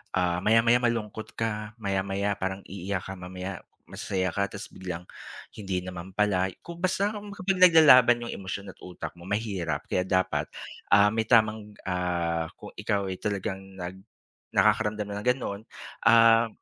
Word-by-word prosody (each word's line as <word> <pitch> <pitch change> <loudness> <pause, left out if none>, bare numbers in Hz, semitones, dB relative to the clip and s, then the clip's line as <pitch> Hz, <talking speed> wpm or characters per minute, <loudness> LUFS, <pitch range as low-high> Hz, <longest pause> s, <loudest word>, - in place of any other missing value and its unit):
ah, 90 -2 +1
maya-maya 115 +4 +4
malungkot 110 -3 -2
ka, 105 -1 -3
maya-maya 100 -1 -1
parang 95 +1 -3
iiyak 95 0 -4
ka 95 -1 -8
mamaya, 90 +1 -6 0.2
masaya 95 -2 -3
ka 100 +2 0
tas 105 +2 -9
biglang, 90 -2 -6 0.5
hindi 95 -3 -4
naman 90 +1 -8
pala. 95 -3 +2 0.2
Kung 170 0 -9
basta, 190 +3 +1
kapag 200 -3 -3
naglalaban 130 -8 +7
yung 120 - -5
emosyon 100 0 -6
at - - -25
utak 90 - -7
mo 85 - -11
mahirap 95 -8 -2
kaya 90 0 0
dapat, 95 -1 +1 0.4
ah, 100 +2 +5
may 110 -1 -1
tamang 110 -3 +2
ah, 85 -3 -1
kung - - -11
ikaw 100 -2 -1
ay 95 - -6
talagang 95 -2 -2 0.2
nag 90 0 -7 0.5
nakakaramdam 105 -1 +2
na 100 - -4
ng - - -9
gano'n 105 -5 -5 0.4
uhm 115 0 +6
100 Hz, 150 wpm, -27 LUFS, 95-115 Hz, 0.5 s, naglalaban